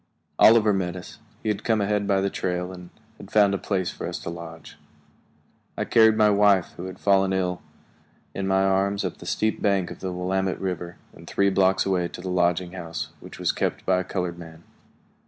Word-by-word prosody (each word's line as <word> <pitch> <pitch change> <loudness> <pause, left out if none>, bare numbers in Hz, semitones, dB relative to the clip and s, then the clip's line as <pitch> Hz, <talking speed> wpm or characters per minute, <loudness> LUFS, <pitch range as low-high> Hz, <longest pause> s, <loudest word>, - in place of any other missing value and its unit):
Oliver 110 -2 +6
met 90 -2 -2
us; 90 - -10 0.2
he - - -1
had 105 -1 -2
come 110 -2 +1
ahead 100 0 0
by 100 -1 +2
the 100 0 -1
trail 90 0 -2
and 90 -1 -11 0.3
had 100 - -11
found 100 -2 +4
a 100 - -1
place 95 -3 -1
for - - -6
us - - -4
to 85 - -5
lodge. 80 -1 -10 1.0
I - - -1
carried 110 -1 +5
my 105 -1 +5
wife, 100 -2 +3
who 90 - -7
had 95 - -7
fallen 95 -1 +3
ill, 90 -1 -1 0.7
in 100 -1 -3
my 95 0 +2
arms 95 +1 +1
up - - -4
the - - -10
steep 110 0 -1
bank 100 -3 +1
of - - -9
the 95 - -4
Willamette 95 +1 -1
River 90 -2 -4 0.2
and - - -15
three 100 0 +2
blocks 95 0 +2
away 90 -3 +1
to 90 - -10
the 95 - -5
lodging 90 0 +1
house, 85 -3 -6
which - - -12
was - - +1
kept - - -2
by 95 -1 +3
a - - -2
colored 90 -2 -4
man. 80 -1 -12
95 Hz, 210 wpm, -24 LUFS, 90-100 Hz, 1.0 s, Oliver